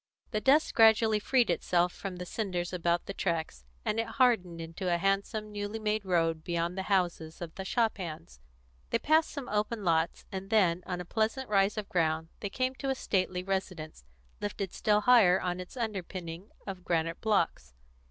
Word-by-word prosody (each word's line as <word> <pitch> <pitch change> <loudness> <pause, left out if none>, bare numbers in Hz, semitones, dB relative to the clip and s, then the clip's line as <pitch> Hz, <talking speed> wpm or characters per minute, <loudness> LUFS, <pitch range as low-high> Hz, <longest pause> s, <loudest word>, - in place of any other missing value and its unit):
The 215 - -1
dust 285 +6 +4
gradually 220 -1 +5
freed 245 +3 +2
itself 175 0 +1
from 195 -2 -6
the 180 0 -6
cinders 180 -3 -3
about 170 -1 0
the 195 - -5
tracks, 160 - -2 0.2
and 215 - 0
it 225 - 0
hardened 225 -9 +2
into 165 +3 -3
a 170 - +3
handsome, 200 +3 -1
newly 205 +1 -4
made 215 -1 -1
road 165 -3 +1
beyond 170 +1 -1
the 190 - -2
houses 175 -4 0
of 170 -2 -6
the 190 - -6
shop 225 +1 0
hands. 155 - -7 0.5
They - - +2
passed 310 +6 +3
some 280 -4 -6
open 210 +1 -1
lots, 165 -1 +1
and 195 0 -5
then, 185 -6 +3
on 180 -1 -3
a - - -7
pleasant 220 +6 -1
rise 200 +1 +3
of 210 -2 -3
ground, 160 -2 0
they 200 - -3
came 255 +5 -1
to 275 - -2
a 265 - +1
stately 185 -6 -1
residence, 185 - -4 0.4
lifted 200 -2 -4
still 210 -1 +2
higher 210 -6 +6
on 180 0 -2
its 180 +7 -9
underpinning 185 -5 -5 0.2
of 190 -3 -6
granite 165 -1 -1
blocks. 170 - 0
190 Hz, 180 wpm, -30 LUFS, 170-215 Hz, 0.5 s, higher